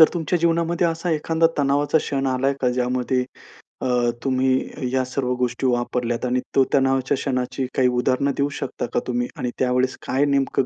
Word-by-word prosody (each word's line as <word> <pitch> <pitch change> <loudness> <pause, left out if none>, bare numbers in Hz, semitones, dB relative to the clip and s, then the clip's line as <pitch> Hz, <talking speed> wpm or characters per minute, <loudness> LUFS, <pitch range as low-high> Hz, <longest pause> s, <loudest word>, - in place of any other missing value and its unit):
तर 160 - +9
तुमच्या 175 +1 0
जीवनामध्ये 170 +1 +1
असा 165 +1 -2
एखांदा 160 +1 +2
तणावाचा 145 +2 +2
क्षण 135 -2 -2
आला 130 +1 0
आहे 140 0 +1
का? 125 - +2
ज्यामध्ये 125 +1 0 0.6
अ, 125 -2 +1
तुम्ही 130 0 0
या 130 -1 +2
सर्व 125 -1 -2
गोष्टी 125 +1 -1
वापरल्यात 120 -1 -1
आणि 125 0 +1 0.2
तो 135 - +6
तणावाच्या 135 0 +2
क्षणाची 130 -1 -2
काही 130 -1 +4
उदाहरण 130 +3 +1
देऊ 140 0 +1
शकता - - -3
का - - +3
तुम्ही? 120 -1 -1
आणि 125 - -2
त्यावेळेस 125 0 +1
काय 135 +2 +2
नेमकं 140 -2 +1
130 Hz, 175 wpm, -22 LUFS, 125-140 Hz, 0.6 s, तर